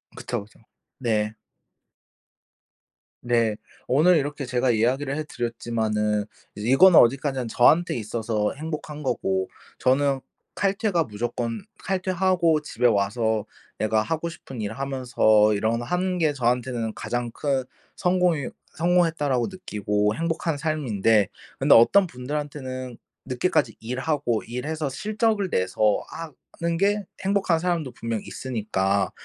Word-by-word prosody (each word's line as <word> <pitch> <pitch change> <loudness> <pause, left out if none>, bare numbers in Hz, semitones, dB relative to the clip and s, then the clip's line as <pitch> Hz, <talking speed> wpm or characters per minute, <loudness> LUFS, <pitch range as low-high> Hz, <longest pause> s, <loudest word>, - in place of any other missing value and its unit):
그쵸 - - -4
그쵸. 105 - -21 0.4
네. 110 -3 0 1.9
네. 115 -3 +2 0.3
오늘 160 +6 +5
이렇게 145 -1 -2
제가 125 +1 0
이야기를 130 +5 +1
해 155 - -2
드렸지만은 110 -4 -1 0.3
이거는 135 - +6
어디까지나 130 0 +2
저한테 155 +10 +4
있어서 110 -1 -2
행복한 150 0 -6
거고 95 -7 0 0.3
저는 135 +1 +2 0.3
칼퇴가 195 -3 +1
무조건 115 - -3 0.2
칼퇴하고 185 -4 +1
집에 135 -4 -3
와서 110 +1 +1 0.3
내가 110 0 +2
하고 165 +6 -2
싶은 135 -7 -9
일 105 +1 -3
하면서 120 -5 +3
이런 110 +3 0
거 120 - -5
하는 180 +4 -1
게 160 -4 +2
저한테는 120 -3 -1
가장 120 -1 -3
큰 135 -1 -1 0.3
성공이 180 -6 +1 0.3
성공했다라고 165 -7 +2
느끼고 105 - -1
행복한 165 -1 -1
삶인데 115 - +2 0.3
근데 - - +6
어떤 185 +12 +6
분들한테는 130 -2 -5 0.3
늦게까지 130 +8 +1
일하고 125 0 -1
일해서 145 +6 -3
실적을 215 - 0
내서 105 - +1
하 165 -1 -7 0.3
하는 170 0 0
게 205 +2 +2 0.2
행복한 195 -4 +2
사람도 165 -6 -1
분명 115 -2 -4
있으니까 100 -6 -1
130 Hz, 285 characters per minute, -24 LUFS, 115-165 Hz, 1.9 s, 이거는